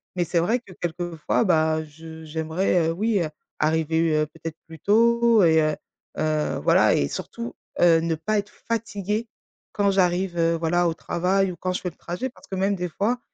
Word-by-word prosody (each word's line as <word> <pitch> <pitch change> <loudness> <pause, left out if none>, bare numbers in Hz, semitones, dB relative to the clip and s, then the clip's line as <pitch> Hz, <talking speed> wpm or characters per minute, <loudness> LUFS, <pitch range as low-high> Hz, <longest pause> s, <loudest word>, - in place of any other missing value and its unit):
mais 180 - +1
c'est 170 +1 +1
vrai 220 +9 +1
que 200 -6 -15
quelquefois, 175 +1 -2
bah, 160 -3 +2
je 160 +1 -11
j'aimerais, 160 +2 0
heu, - - +1
oui, 210 +4 0
heu, 160 - -1 0.3
arriver, 160 +1 +1
heu, 155 0 +2
peut-être 160 +1 -8
plus 160 -1 -11
tôt 230 +3 +4
et 160 -1 +5
heu 155 -1 +1 0.4
heu, 155 -1 0
voilà, - - +5
et 70 - +1
surtout, 235 - -6 0.2
heu, 170 -2 +6
ne 165 0 0
pas 215 +7 -1
être 205 +1 -6 0.2
fatiguée 220 -1 -2 0.4
quand 200 -1 +2
j'arrive, 180 -1 +1
heu, 165 0 +2
voilà, 175 +2 +1
au 165 - 0
travail 185 +4 0
ou - - -8
quand 185 +3 -2
je - - -3
fais 180 - -2
le 165 - -18
trajet 180 +10 -4
parce 250 - -19
que, 195 - -5
même 195 +2 +1
des 180 -1 -3
fois 220 +9 -1
175 Hz, 200 wpm, -24 LUFS, 160-200 Hz, 0.4 s, heu